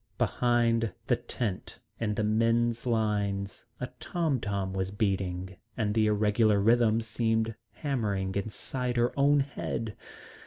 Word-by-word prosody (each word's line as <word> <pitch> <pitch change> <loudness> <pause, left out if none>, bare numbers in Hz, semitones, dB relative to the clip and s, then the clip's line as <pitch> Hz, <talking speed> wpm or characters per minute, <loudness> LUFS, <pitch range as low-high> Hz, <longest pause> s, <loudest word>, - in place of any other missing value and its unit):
Behind 115 -3 +2
the - - +3
tent 105 -7 -4 0.2
in 105 -2 -1
the 110 - 0
men's 115 +2 +2
lines 100 -4 -1
a - - -2
tom 160 -7 0
tom 100 -3 -2
was 95 -1 -1
beating, 95 -2 -2 0.2
and 105 -3 0
the 110 -1 +3
irregular 105 0 +3
rhythm 115 +1 +4
seemed 115 0 0 0.2
hammering 105 -10 -1
inside 120 +5 -3
her 120 +1 +2
own 140 +1 +4
head. 115 -5 -4
110 Hz, 125 wpm, -29 LUFS, 100-120 Hz, 0.2 s, rhythm